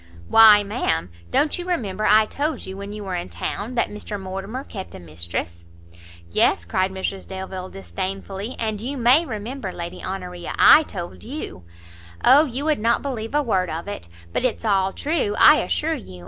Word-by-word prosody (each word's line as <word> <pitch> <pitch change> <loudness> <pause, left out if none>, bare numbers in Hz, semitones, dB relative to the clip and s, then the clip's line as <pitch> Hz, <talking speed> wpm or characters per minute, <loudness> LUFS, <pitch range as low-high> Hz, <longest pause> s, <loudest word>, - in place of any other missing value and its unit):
"Why, 215 - +8
ma'am, 200 - -1 0.2
don't 300 - +1
you 350 - -6
remember 215 - -1
I 215 +1 +6
told 290 +4 -3
you 190 - -7
when 200 +1 -7
you 210 0 -7
were 190 -2 -5
in 175 -1 -3
town 225 +5 -4
that 235 - +1
Mr 210 0 -5
Mortimer 195 +7 -5
kept 195 -8 -8
a - - -8
mistress 85 0 -5 0.3
" - - -20 0.3
"Yes!" 85 0 +2
cried 185 - 0
Mrs 190 0 -4
Delvile, 190 -1 -6
disdainfully, 195 - -5
"and 215 -2 -2
you 270 +5 -4
may 260 +7 +4
remember, 220 0 -5
Lady 175 -1 -7
Honoria, 180 -2 -5
I - - +8
told 180 - -7
you 245 - -7 0.3
" 85 0 -11
"O, 285 +5 +7
you 270 +1 -4
would 310 -5 +1
not 230 +2 +1
believe 245 -3 -4
a 295 - +3
word 190 -8 0
of 165 +4 -5
it! 145 - -6 0.2
but - - 0
it's 245 -2 -1
all 195 -2 +2
true, 280 - -1
I 305 - +8
assure 320 +1 0
you! 155 - -8
205 Hz, 190 wpm, -22 LUFS, 185-250 Hz, 0.3 s, Why